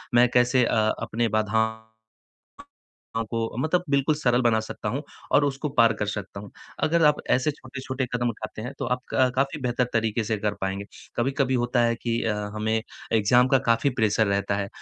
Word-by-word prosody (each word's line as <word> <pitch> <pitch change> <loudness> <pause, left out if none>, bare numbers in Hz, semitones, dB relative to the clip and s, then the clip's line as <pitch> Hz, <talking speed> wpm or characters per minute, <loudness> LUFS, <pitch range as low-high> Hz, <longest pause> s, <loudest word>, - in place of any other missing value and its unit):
मैं 120 +1 +6
कैसे 125 +1 +4
अ, - - 0 0.3
अपने 115 +1 -1
बाधाओं 110 +1 0 1.4
को 115 -1 -2
मतलब 160 +6 +1
बिल्कुल 140 +2 +2
सरल 125 -5 +2
बना 115 -2 +3
सकता 110 -1 -5
हूँ 140 - -2 0.3
और 145 - +5
उसको 140 +2 -2
पार 115 0 +6
कर 105 - 0
सकता 100 -1 -5
हूँ, 100 0 -10 0.3
अगर 165 +1 +3
आप 150 0 +3
ऐसे 130 +4 +1
छोटे-छोटे 130 -1 -5
कदम 120 0 0
उठाते 110 -1 -6
हैं, 125 - -6
तो - - -2
आप 125 0 -1
क 130 -1 +4
काफ़ी 135 +4 0
बेहतर 125 0 0
तरीके 115 0 0
से 110 0 -1
कर 105 0 -1
पाएँगे। 95 +1 -2 0.3
कभी-कभी 135 +2 0
होता 120 0 +1
है 115 0 +2
कि 115 0 -2
अ, 110 - +1 0.2
हमें 110 +1 0 0.3
एग्जाम 115 +3 +4
का - - +7
काफ़ी 115 +4 +3
प्रेशर 110 0 +3
रहता 100 0 0
है, 100 -1 -2
120 Hz, 185 wpm, -25 LUFS, 110-130 Hz, 1.4 s, का